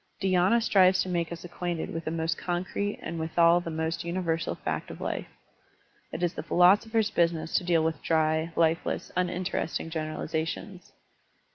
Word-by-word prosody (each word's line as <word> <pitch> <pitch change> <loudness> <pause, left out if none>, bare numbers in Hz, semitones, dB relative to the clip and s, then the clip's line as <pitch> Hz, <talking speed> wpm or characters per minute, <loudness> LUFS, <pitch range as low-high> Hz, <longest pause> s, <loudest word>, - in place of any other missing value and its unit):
Dhy^na 190 +3 +3
strives 185 -4 +5
to 185 - -6
make 170 -2 -1
us 170 0 -7
acquainted 175 -1 -4
with 165 0 -5
the - - -1
most 160 0 -1
concrete 185 +4 -2
and 165 0 -4
withal 170 +2 +4
the 175 - -6
most 160 +1 -2
universal 170 -1 -1
fact - - -4
of - - -9
life. - - -3 0.8
It 175 - -4
is 175 - +1
the - - -5
philosopher's 210 +4 +3
business 165 -3 0
to - - -1
deal 170 -2 +2
with 160 -2 -1
dry, 160 0 +1
lifeless, 165 0 0
uninteresting 180 -2 -2
generalizations. 160 +3 -4
170 Hz, 155 wpm, -28 LUFS, 160-180 Hz, 0.8 s, strives